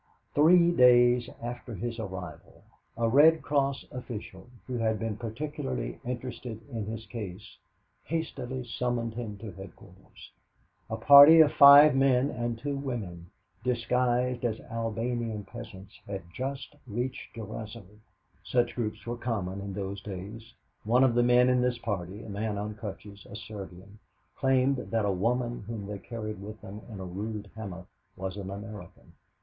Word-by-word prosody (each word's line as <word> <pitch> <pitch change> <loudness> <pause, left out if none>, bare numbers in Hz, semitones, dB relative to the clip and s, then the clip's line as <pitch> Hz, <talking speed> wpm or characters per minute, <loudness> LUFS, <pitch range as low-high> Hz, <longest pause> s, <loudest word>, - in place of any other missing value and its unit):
Three 170 +3 +6
days 125 -4 +5
after 120 -1 -6
his 115 +3 -4
arrival, 95 -4 -8 0.3
a 115 0 +1
Red 150 +6 +6
Cross 140 -2 0
official, 120 -4 -8 0.2
who 125 -2 -4
had 110 -1 +1
been 115 -1 -3
particularly 110 - -4
interested 120 -2 -5
in 110 -4 -4
his 110 0 -6
case, 105 -3 -8 0.5
hastily 135 -6 -3
summoned 120 -1 -2
him 110 -3 -6
to 105 0 -8
headquarters. 95 0 -14 0.6
A - - -2
party 145 +3 +9
of 150 -2 +5
five 140 +1 +9
men 135 0 +3
and 120 -1 -3
two 140 +4 -3
women, 105 -11 -5 0.3
disguised 125 0 0
as 115 -2 -1
Albanian 115 -1 -2
peasants, 100 -2 -11
had 95 -2 -5
just 135 +1 -5
reached 125 +4 -4
Durazzo. 110 0 -7 0.6
Such 120 -1 +1
groups 110 -3 -4
were 120 0 -4
common 100 -6 -3
in 100 0 -5
those 95 0 -5
days. 105 +4 -8 0.3
One 120 +4 +4
of 130 -3 +4
the 120 - +3
men 125 +1 +5
in 125 -1 +3
this 125 -1 +1
party 100 -3 -4
a - - -10
man 105 +1 -3
on 105 +1 -4
crutches, 100 -1 -9
a - - -9
Serbian, 100 -2 -10 0.4
claimed 135 0 +2
that 115 -3 -1
a 100 - +2
woman 120 +5 -1
whom 110 -3 -5
they 100 0 -6
carried 110 -2 -6
with 105 +2 -8
them 105 +2 -9
in 105 -4 -8
a 95 - -5
rude 105 +3 -5
hammock 95 -5 -7 0.3
was 95 0 -4
an 95 -2 -6
American. 105 +2 -9
115 Hz, 150 wpm, -29 LUFS, 100-125 Hz, 0.6 s, party